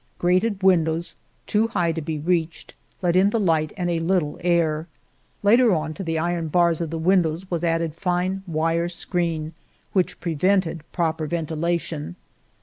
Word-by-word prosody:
Grated 185 +3 +1
windows, 170 -3 +2 0.3
too 215 +2 +2
high 175 -7 0
to 165 0 -4
be 155 0 -3
reached, 165 +1 -2 0.3
let 175 -1 +2
in 190 +2 +5
the 230 - 0
light 160 -6 +1
and 180 -2 -1
a 170 -1 0
little 165 -3 0
air. 165 -2 +1 0.6
Later 230 +3 +5
on, 155 0 -2
to 195 - -7
the 165 -2 -1
iron 170 0 -1
bars 170 +1 +2
of 165 - -2
the 165 - -4
windows 175 +1 +1
was 170 -1 -1
added 165 -2 0
fine 180 +2 -1
wire 165 +1 0
screen, 170 -2 -2 0.4
which 185 -2 0
prevented 170 0 +1
proper 160 -3 -1
ventilation. 160 - -2
170 Hz, 155 wpm, -23 LUFS, 160-180 Hz, 0.6 s, in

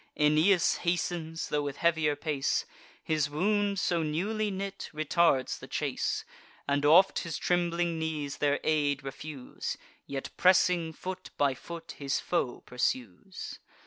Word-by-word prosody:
Aeneas 155 +5 +4
hastens, 170 -2 -2
tho' 150 - +1
with 145 -1 -4
heavier 160 -3 +2
pace— 145 -3 0 0.4
His 155 -2 +1
wound, 200 +6 +1
so 175 -2 +1
newly 200 +8 -1
knit, 195 0 -5
retards 155 -3 +2
the - - -10
chase, - - -1 0.4
And 140 0 +1
oft 180 +6 +6
his 165 -3 -4
trembling 175 -1 0
knees 150 -3 -3
their 145 -1 +2
aid 145 -3 +1
refuse— 135 0 -6 0.3
Yet, 135 -1 -5
pressing 180 -2 +4
foot 185 +3 -6
by 140 -2 +3
foot, 165 +4 -8
his 140 -1 0
foe 130 -8 -1
pursues. 125 - -3
160 Hz, 130 wpm, -30 LUFS, 145-175 Hz, 0.4 s, oft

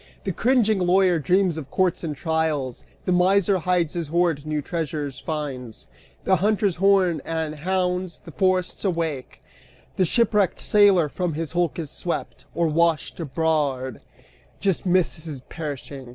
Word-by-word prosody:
The 195 - -1
cringing 220 0 +2
lawyer 180 -1 +3
dreams 175 +2 +2
of 140 -3 -9
courts 180 +2 0
and 155 -3 -3
trials, 155 -5 -1 0.2
The - - 0
miser 190 +2 +3
hides 175 -2 0
his 170 -3 -3
hoard, 165 -2 0
new 155 -1 -1
treasures 150 -4 -4
finds: 135 -7 -5 0.4
The 190 - +3
hunter's 205 -1 +1
horn 185 -4 +3
and 160 -2 -3
hounds 180 +2 -1
the 165 - -9
forests 185 +1 0
wake, 165 -8 -3 0.5
The 185 - +3
shipwrecked 210 -1 +2
sailor 200 -6 +4
from 175 +3 -2
his 160 -1 -3
hulk 175 -1 0
is 155 -4 -5
swept. 175 - -4
Or, 170 - +2
washed 165 0 +1
aboard, 145 -4 -1 0.6
just 195 -1 0
misses 165 -5 0
perishing. 140 -3 -7
170 Hz, 140 wpm, -24 LUFS, 150-185 Hz, 0.6 s, sailor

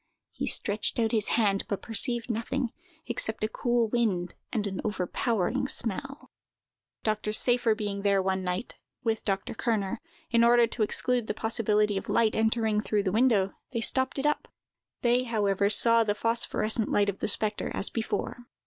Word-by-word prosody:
He - - -4
stretched 210 +1 +1
out 225 -2 +1
his 215 -3 +1
hand, 200 -4 +2
but 200 - -3
perceived 235 +1 +1
nothing, 235 +2 -2 0.3
except 225 -2 -2
a - - +2
cool 240 +1 0
wind 210 -7 0 0.2
and 215 -4 -1
an 195 -2 -3
overpowering 210 +4 -1
smell. 270 +5 -3 0.7
Dr. 215 -1 -1
Seyffer 240 0 +3
being 205 -2 -3
there 200 -1 +3
one 190 0 -1
night, 180 +5 -4 0.3
with 225 -1 -1
Dr. 195 -1 -2
Kerner, 220 -4 -1 0.3
in 235 -1 +4
order 240 0 +6
to 230 0 -5
exclude 240 +2 0
the - - -2
possibility 215 -2 +1
of - - -5
light 225 -2 +2
entering 220 -1 +1
through 210 -2 0
the 190 - 0
window, 215 -3 +3 0.2
they 230 - -1
stopped 260 +4 +1
it 270 - -2
up. 295 0 0 0.6
They, 245 +1 +3
however, 200 -4 +1
saw 230 +2 +5
the 205 -2 0
phosphorescent 230 -1 0
light 205 0 +2
of 200 -1 -2
the - - -1
spectre, 210 0 -1
as - - -4
before. 225 +1 -3
220 Hz, 165 wpm, -28 LUFS, 205-235 Hz, 0.7 s, order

